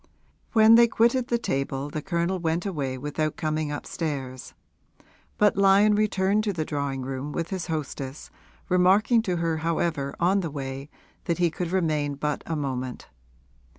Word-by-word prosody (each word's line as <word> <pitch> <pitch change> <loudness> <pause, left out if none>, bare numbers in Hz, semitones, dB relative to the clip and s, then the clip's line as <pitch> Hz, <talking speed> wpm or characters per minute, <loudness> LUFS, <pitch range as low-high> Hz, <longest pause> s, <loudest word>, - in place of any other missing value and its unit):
When 220 -1 +7
they 235 +1 +7
quitted 235 +2 +2
the 235 - +1
table 140 -7 -2
the 155 - -3
Colonel 175 +1 -1
went 165 +1 -1
away 140 -9 -2
without 150 +3 -2
coming 155 -1 -1
upstairs; 140 -4 -5 0.8
but 210 -1 +4
Lyon 200 +2 +5
returned 205 0 +1
to 205 - 0
the 160 -3 -2
drawing 140 -3 -3
room 135 +2 -4
with 165 +4 -4
his 185 -3 -3
hostess, 145 -3 -5 0.4
remarking 195 +6 +4
to 185 -5 -1
her 165 -1 0
however 160 -3 -1
on 185 +3 +3
the 170 -4 -3
way 135 0 -6 0.4
that 170 - 0
he 175 -2 +2
could 175 +1 -4
remain 155 -6 0
but 150 +1 -2
a 165 - -2
moment. 130 -4 -4
165 Hz, 155 wpm, -26 LUFS, 145-190 Hz, 0.8 s, When